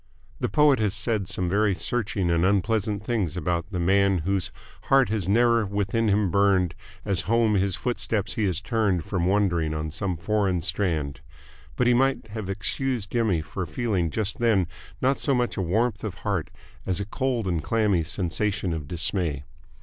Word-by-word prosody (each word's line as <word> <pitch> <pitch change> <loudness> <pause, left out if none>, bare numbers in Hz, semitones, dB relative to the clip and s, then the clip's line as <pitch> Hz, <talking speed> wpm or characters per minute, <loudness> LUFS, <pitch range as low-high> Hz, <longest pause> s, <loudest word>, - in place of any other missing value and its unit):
The - - -1
poet 150 -4 +4
has 105 -2 0
said 110 -5 -1
some 90 0 -1
very 100 +1 +2
searching 95 0 -1
and 85 0 +2
unpleasant 100 +1 +1
things 100 -9 -1
about 90 0 -1
the 90 -4 -3
man 95 0 +3
"whose 95 -1 0 0.3
heart 135 -1 +4
has 105 -4 -1
ne'er 115 +1 +4
within 100 +3 0
him 100 -3 +2
burned 95 -3 +3 0.3
as 95 -4 +1
home 115 -2 +3
his 95 -2 +2
footsteps 110 -4 -1
he 110 - 0
has 95 -2 0
turned 100 -7 0
from 90 -3 -1
wandering 90 -6 +1
on 75 0 -3
some 95 0 -2
foreign 100 -2 0
strand," 75 -10 -1 0.5
but 125 - +1
he 125 - +5
might 135 -2 +1
have 105 -2 -5
excused 105 +3 -2
Jimmy 110 -9 +1
for 90 +3 -5
feeling 95 -1 -1
just 105 +3 -3
then 110 -6 +3 0.4
not 135 +2 +2
so 140 - +2
much 125 -1 0
a - - -1
warmth 105 +5 0
of 105 -5 -4
heart 100 -7 -1 0.3
as 95 -1 -1
a 100 - -2
cold 120 0 -1
and 85 -3 0
clammy 105 0 +2
sensation 90 +2 -2
of 75 -3 -5
dismay. 85 -4 -1
100 Hz, 175 wpm, -25 LUFS, 90-110 Hz, 0.5 s, he